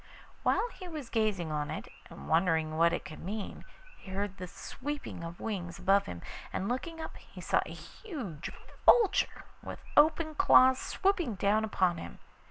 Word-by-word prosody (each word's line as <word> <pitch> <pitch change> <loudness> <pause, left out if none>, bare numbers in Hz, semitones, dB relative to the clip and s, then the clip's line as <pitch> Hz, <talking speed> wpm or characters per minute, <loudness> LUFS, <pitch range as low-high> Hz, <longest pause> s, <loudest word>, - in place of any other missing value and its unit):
While - - +2
he 370 -1 -9
was 305 -8 -7
gazing 210 -8 +1
on 150 -1 -2
it - - -5 0.2
and 70 - -10
wondering 160 -2 +2
what 170 +1 +5
it 175 - -3
could 155 - -8
mean, 205 +4 -5 0.3
he - - -13
heard 195 0 -3
the 180 - -6
sweeping 260 +4 -6
of 170 +1 -7
wings 180 -6 -4
above 195 +1 +3
him, 85 -1 -7 0.3
and 190 - -2
looking 325 +8 -3
up 320 - -6
he - - -14
saw - - +2
a - - -8
huge 250 - -7 0.3
vulture 445 -5 +5 0.2
with - - -8
open 315 +1 +5
claws 260 -3 +6
swooping 365 - 0
down 205 +3 +2
upon 185 -5 +1
him. - - -8
205 Hz, 170 wpm, -31 LUFS, -, 0.3 s, claws